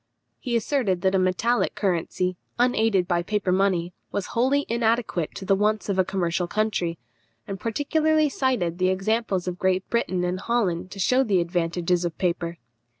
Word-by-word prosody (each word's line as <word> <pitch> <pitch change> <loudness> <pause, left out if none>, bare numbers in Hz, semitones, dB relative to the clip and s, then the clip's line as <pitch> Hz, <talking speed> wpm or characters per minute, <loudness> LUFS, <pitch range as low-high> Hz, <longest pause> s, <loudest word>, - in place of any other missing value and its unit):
He 245 -3 -2
asserted 225 -6 0
that 190 0 +3
a 190 - +3
metallic 185 +7 +1
currency, 185 -1 -1 0.2
unaided 225 -6 +2
by 175 -1 +1
a - - -2
paper 205 -1 -1
money, 180 -2 +1 0.2
was 200 - -2
wholly 270 +4 +2
inadequate 230 -7 0
to 190 - -6
the 195 - +3
wants 210 +1 0
of 195 -1 0
a - - +6
commercial 175 -2 -1
country, 195 -5 -1 0.5
and 195 -1 -6
particularly 310 +6 +1
cited 245 - -1
the 185 0 +3
examples 195 -1 0
of 180 0 -3
Great 185 0 +1
Britain 185 -6 0
and 180 +1 -1
Holland 190 -7 -1
to 200 - -10
shew 255 +7 +3
the 200 -7 +2
advantages 170 0 0
of 170 -2 -3
paper. 170 -2 -1
190 Hz, 170 wpm, -25 LUFS, 180-230 Hz, 0.5 s, a